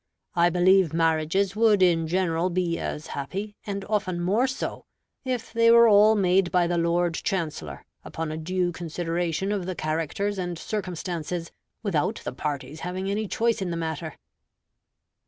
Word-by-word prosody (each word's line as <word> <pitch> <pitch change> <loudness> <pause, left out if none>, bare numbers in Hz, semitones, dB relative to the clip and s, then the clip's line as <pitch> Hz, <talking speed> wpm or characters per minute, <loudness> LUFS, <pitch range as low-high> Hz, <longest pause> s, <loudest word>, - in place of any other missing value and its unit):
I 170 0 +4
believe 180 -1 +4
marriages 165 +4 +1
would 215 -3 +4
in 165 -3 +3
general 175 0 +1
be 175 -2 -1
as 150 - -4
happy, 195 +9 -5
and 200 -1 -4
often 205 -4 -1
more 205 +9 +2
so, 260 +1 -4 0.4
if 255 -4 -3
they 230 0 +4
were 235 0 +8
all 215 +1 +6
made 190 -2 +2
by 180 -1 +3
the 170 0 0
Lord 170 0 +1
Chancellor, 165 -2 -3 0.2
upon 160 -1 -5
a 155 - -4
due 180 +2 -1
consideration 175 +2 -2
of 195 -4 -2
the 185 - -3
characters 165 +6 -2
and 175 -2 -3
circumstances, 175 -4 -4 0.3
without 170 -9 0
the - - -4
parties 145 +2 -4
having 185 +3 -3
any 210 +1 -1
choice 230 +1 0
in 185 - -2
the 170 - -3
matter. 160 -1 -4
180 Hz, 155 wpm, -26 LUFS, 165-200 Hz, 0.4 s, were